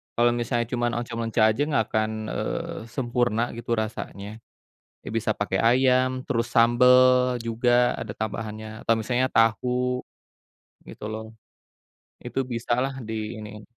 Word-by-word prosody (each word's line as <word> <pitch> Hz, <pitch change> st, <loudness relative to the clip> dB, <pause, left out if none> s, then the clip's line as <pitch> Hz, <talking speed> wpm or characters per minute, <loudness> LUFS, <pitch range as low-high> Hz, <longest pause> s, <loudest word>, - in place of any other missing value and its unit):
kalau 120 Hz, 0 st, +4 dB
misalnya 120 Hz, 0 st, 0 dB
cuma 120 Hz, -1 st, 0 dB
oncom 115 Hz, -1 st, -4 dB
leunca 115 Hz, 0 st, 0 dB
aja 130 Hz, -, -3 dB
nggak 115 Hz, -7 st, +2 dB
akan, 110 Hz, 0 st, +1 dB, 0.2 s
eee, -, -, -3 dB, 0.2 s
sempurna 120 Hz, -3 st, 0 dB, 0.2 s
gitu 120 Hz, 0 st, -9 dB
rasanya. 105 Hz, -2 st, -6 dB, 0.8 s
Ya, -, -, -6 dB
bisa 110 Hz, -1 st, 0 dB
pakai 95 Hz, -2 st, 0 dB
ayam, 130 Hz, +1 st, +4 dB, 0.2 s
terus 115 Hz, -1 st, 0 dB
sambel 120 Hz, +2 st, +6 dB, 0.5 s
juga, 120 Hz, +2 st, +1 dB, 0.3 s
ada 105 Hz, -, -5 dB
tambahannya 110 Hz, 0 st, -4 dB, 0.2 s
atau 115 Hz, -, +4 dB
misalnya 125 Hz, +3 st, 0 dB
tahu, 125 Hz, +3 st, +2 dB, 0.9 s
gitu, -, -, -11 dB
loh. 110 Hz, 0 st, -5 dB, 1.0 s
Itu -, -, -3 dB
bisalah 120 Hz, +3 st, -1 dB
diiniin. 110 Hz, -1 st, -6 dB
115 Hz, 125 wpm, -25 LUFS, 110-125 Hz, 1.0 s, sambel